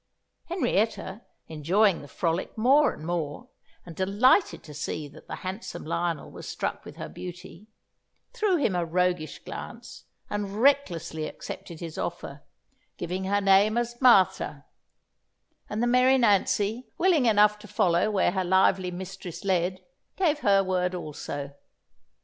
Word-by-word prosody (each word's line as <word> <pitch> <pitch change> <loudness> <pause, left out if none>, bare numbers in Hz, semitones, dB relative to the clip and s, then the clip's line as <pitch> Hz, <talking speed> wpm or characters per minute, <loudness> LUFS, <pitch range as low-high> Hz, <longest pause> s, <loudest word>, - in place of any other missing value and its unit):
Henrietta, 225 - -1 0.3
enjoying 175 +5 +2
the 145 - -11
frolic 165 - -2
more 270 +5 +4
and 155 - -10
more, 170 - -3 0.4
and 170 - -10
delighted 205 - +3
to 150 - -11
see 150 +1 -4
that 150 +2 -16
the - - -5
handsome 190 +5 -6
Lionel 170 -1 -2
was - - -9
struck - - -3
with - - -11
her - - -6
beauty, 180 +2 -10 0.7
threw 425 -6 +1
him 285 - +1
a 175 -1 0
roguish 175 -1 0
glance, - - -9 0.2
and 205 0 -4
recklessly 190 - +1
accepted 170 -1 -8
his 165 -2 -6
offer, - - -5 0.6
giving 180 +2 -3
her 200 +1 +1
name 200 +3 +4
as 240 +1 -2
Martha; 235 -8 +4 1.0
and 215 +3 -2
the - - +3
merry 250 +2 +4
Nancy, 215 +1 +2
willing 335 -8 +3
enough 210 -1 +4
to 210 - -12
follow 180 -2 +2
where 195 -4 +2
her 190 0 -1
lively 190 0 +3
mistress 185 -1 -7
led, 185 -1 0 0.3
gave 320 -6 +1
her 200 -6 +4
word 185 -1 0
also. 145 -4 -6
190 Hz, 140 wpm, -27 LUFS, 175-225 Hz, 1.0 s, more